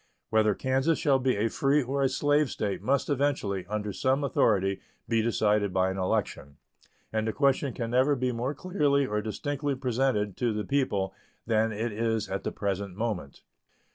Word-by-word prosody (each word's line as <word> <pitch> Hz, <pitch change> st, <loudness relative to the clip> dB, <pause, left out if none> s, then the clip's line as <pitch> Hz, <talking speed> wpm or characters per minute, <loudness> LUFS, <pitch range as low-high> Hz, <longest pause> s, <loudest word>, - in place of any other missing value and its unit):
Whether 110 Hz, -2 st, +3 dB
Kansas 135 Hz, +5 st, +1 dB
shall 135 Hz, -2 st, +3 dB
be 130 Hz, 0 st, +1 dB
a 105 Hz, +3 st, +1 dB
free 140 Hz, +5 st, +2 dB
or 135 Hz, +3 st, -2 dB
a 135 Hz, -, +3 dB
slave 145 Hz, +2 st, +2 dB
State 100 Hz, -2 st, -3 dB
must 135 Hz, +1 st, +1 dB
eventually, 130 Hz, -, -1 dB
under 105 Hz, 0 st, -3 dB
some 135 Hz, +6 st, +1 dB
authority, 100 Hz, -7 st, +2 dB, 0.3 s
be 115 Hz, -1 st, +2 dB
decided 105 Hz, -3 st, +1 dB
by 95 Hz, 0 st, +1 dB
an 95 Hz, -, -4 dB
election; 70 Hz, -6 st, -2 dB, 0.6 s
and 110 Hz, 0 st, 0 dB
the -, -, +1 dB
question 140 Hz, 0 st, +2 dB
can 115 Hz, -1 st, -4 dB
never 130 Hz, +4 st, +3 dB
be 125 Hz, -1 st, 0 dB
more 125 Hz, +4 st, -2 dB
clearly 145 Hz, -5 st, +1 dB
or 105 Hz, -4 st, -1 dB
distinctly 145 Hz, +6 st, -2 dB
presented 125 Hz, -5 st, 0 dB
to 120 Hz, -3 st, 0 dB
the 105 Hz, -1 st, -3 dB
people 105 Hz, -7 st, 0 dB, 0.3 s
than 110 Hz, 0 st, +2 dB
it 110 Hz, +2 st, -2 dB
is 110 Hz, 0 st, -1 dB
at 95 Hz, -, -3 dB
the -, -, -2 dB
present 100 Hz, -2 st, -3 dB
moment. 105 Hz, -10 st, -4 dB
115 Hz, 175 wpm, -28 LUFS, 105-135 Hz, 0.6 s, Whether